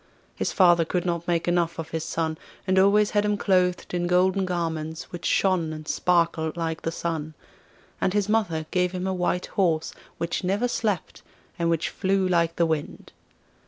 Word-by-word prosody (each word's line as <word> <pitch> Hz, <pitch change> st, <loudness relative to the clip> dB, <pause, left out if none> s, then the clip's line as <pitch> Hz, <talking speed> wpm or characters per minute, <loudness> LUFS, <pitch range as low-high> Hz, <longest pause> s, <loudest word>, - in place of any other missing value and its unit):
His -, -, -1 dB
father 175 Hz, -3 st, +5 dB
could 175 Hz, +2 st, -2 dB
not 170 Hz, -1 st, -2 dB
make 170 Hz, -1 st, 0 dB
enough 175 Hz, -1 st, +1 dB
of 165 Hz, -1 st, -6 dB
his 160 Hz, -1 st, -2 dB
son, 160 Hz, -1 st, -2 dB, 0.3 s
and 190 Hz, 0 st, +3 dB
always 205 Hz, +2 st, +4 dB
had 205 Hz, -1 st, +2 dB
him 210 Hz, 0 st, +1 dB
clothed 180 Hz, -3 st, +1 dB
in 175 Hz, 0 st, 0 dB
golden 185 Hz, +2 st, +3 dB
garments 160 Hz, -2 st, -3 dB
which 175 Hz, -, -4 dB
shone 180 Hz, -5 st, +2 dB
and 155 Hz, 0 st, -8 dB
sparkled 170 Hz, -2 st, +1 dB
like 160 Hz, -1 st, -2 dB
the 165 Hz, -, -2 dB
sun; 160 Hz, -2 st, -4 dB, 0.7 s
and -, -, +2 dB
his 205 Hz, 0 st, +1 dB
mother 190 Hz, -8 st, 0 dB
gave 180 Hz, 0 st, +1 dB
him 185 Hz, 0 st, -3 dB
a 190 Hz, -, 0 dB
white 180 Hz, 0 st, 0 dB
horse, 165 Hz, -5 st, 0 dB, 0.2 s
which 170 Hz, +2 st, -2 dB
never 200 Hz, +7 st, +1 dB
slept, 215 Hz, -7 st, -2 dB, 0.4 s
and 170 Hz, 0 st, +1 dB
which 165 Hz, -1 st, 0 dB
flew 190 Hz, -1 st, 0 dB
like 170 Hz, -2 st, +1 dB
the 170 Hz, -, +2 dB
wind. 160 Hz, -2 st, -3 dB
175 Hz, 180 wpm, -25 LUFS, 165-190 Hz, 0.7 s, father